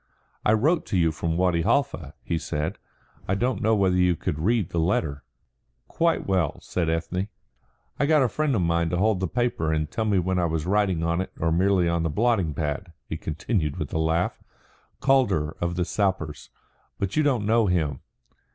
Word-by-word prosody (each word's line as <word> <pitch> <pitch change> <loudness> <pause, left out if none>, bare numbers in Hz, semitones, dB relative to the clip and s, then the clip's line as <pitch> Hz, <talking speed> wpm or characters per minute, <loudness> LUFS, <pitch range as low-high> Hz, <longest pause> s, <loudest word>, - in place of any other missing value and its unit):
"I 105 - +4
wrote 155 +10 +2
to 95 - 0
you 80 -2 +3
from 80 +1 -2
Wadi 90 -2 +2
Halfa," 85 - 0
he 85 -2 -1
said. 75 -1 -3 0.5
"I 95 - +1
don't 125 +5 -1
know 110 0 +3
whether 95 -3 +2
you 90 -1 +3
could 75 -1 -3
read 105 +1 +1
the 85 - -1
letter." 80 -5 0 0.6
"Quite 170 0 +1
well," 90 -6 0
said 85 -3 -2
Ethne. 85 +4 -1 0.7
"I 140 - +2
got 155 -2 +5
a - - +3
friend 145 +3 0
of 95 - +1
mine 85 0 +1
to 90 - -1
hold 105 +1 +2
the 95 - -1
paper 120 -7 0
and 75 -1 -1
tell 110 - -1
me 105 -2 +2
when 90 +1 +1
I 90 - +2
was 80 -1 -1
writing 95 -3 +1
on 85 +2 +1
it 95 - -5
or 80 - +1
merely 90 +1 +3
on 85 0 +1
the 80 - 0
blotting 95 -3 +1
pad," 75 +3 -3 0.2
he - - -4
continued 80 - -2
with - - -5
a 80 - 0
laugh. 80 +2 0 0.6
"Calder 125 - +2
of 85 0 -1
the 90 -1 0
Sappers 95 -6 -2 0.5
but 100 -1 -2
you 155 - +4
don't 130 -8 +1
know 110 0 +3
him." 80 -7 0
90 Hz, 195 wpm, -25 LUFS, 80-105 Hz, 0.7 s, got